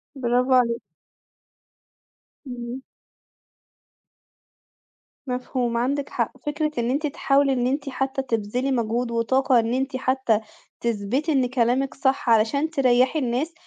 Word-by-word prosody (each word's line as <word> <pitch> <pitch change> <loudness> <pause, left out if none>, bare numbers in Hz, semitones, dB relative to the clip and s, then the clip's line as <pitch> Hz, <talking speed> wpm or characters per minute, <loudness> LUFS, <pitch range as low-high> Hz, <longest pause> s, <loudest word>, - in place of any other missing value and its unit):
bravo 250 0 +1
عليكِ. 235 -2 +2 1.7
إمم. 245 +1 -6 2.4
مفهوم، 250 -1 -2
عندِك 275 +4 -1
حق. - - -1
فكرة 300 +1 -1
إن 235 0 0
أنتِ 295 +3 0
تحاولي 280 -2 +2
إن 245 -1 0
أنتِ 280 +2 -2
حتى 270 0 -2
تبذلي 245 +1 -1
مجهود 235 0 -1
وطاقة 250 +2 +2
إن 230 +1 0
أنتِ 265 +1 -1
حتى 260 -4 +1 0.4
تثبْتي 235 +7 -1
إن 265 -3 +3
كلامِك 250 +2 +1
صح، 265 -2 0
علشان 230 +8 +3
تريحي 260 -1 +3
الناس، 260 +5 -1
255 Hz, 115 wpm, -24 LUFS, 235-275 Hz, 2.4 s, إن